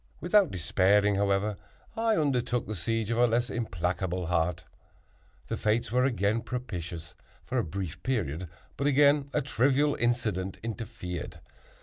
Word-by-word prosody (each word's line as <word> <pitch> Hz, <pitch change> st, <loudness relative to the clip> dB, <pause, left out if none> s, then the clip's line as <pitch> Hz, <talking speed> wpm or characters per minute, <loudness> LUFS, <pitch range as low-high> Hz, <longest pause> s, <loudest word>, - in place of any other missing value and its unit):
Without 185 Hz, +2 st, +4 dB
despairing, 100 Hz, +3 st, +3 dB
however, 100 Hz, +1 st, +1 dB, 0.4 s
I 225 Hz, -1 st, +2 dB
undertook 125 Hz, -5 st, +1 dB
the 110 Hz, -, -4 dB
siege 115 Hz, +3 st, -1 dB
of 115 Hz, -, 0 dB
a 120 Hz, -, +6 dB
less 120 Hz, +1 st, 0 dB
implacable 90 Hz, -4 st, -2 dB
heart. 85 Hz, 0 st, 0 dB, 0.8 s
The -, -, -3 dB
fates 110 Hz, 0 st, 0 dB
were 125 Hz, +1 st, +3 dB
again 115 Hz, -3 st, +1 dB
propitious 85 Hz, -10 st, -5 dB, 0.3 s
for -, -, -1 dB
a -, -, +1 dB
brief 90 Hz, -1 st, -5 dB
period; 90 Hz, -, -2 dB, 0.3 s
but 140 Hz, -, 0 dB
again 145 Hz, 0 st, +4 dB
a 150 Hz, +1 st, 0 dB
trivial 140 Hz, +3 st, +2 dB
incident 110 Hz, -6 st, -1 dB
interfered. 110 Hz, -6 st, -5 dB
110 Hz, 135 wpm, -29 LUFS, 95-125 Hz, 0.8 s, a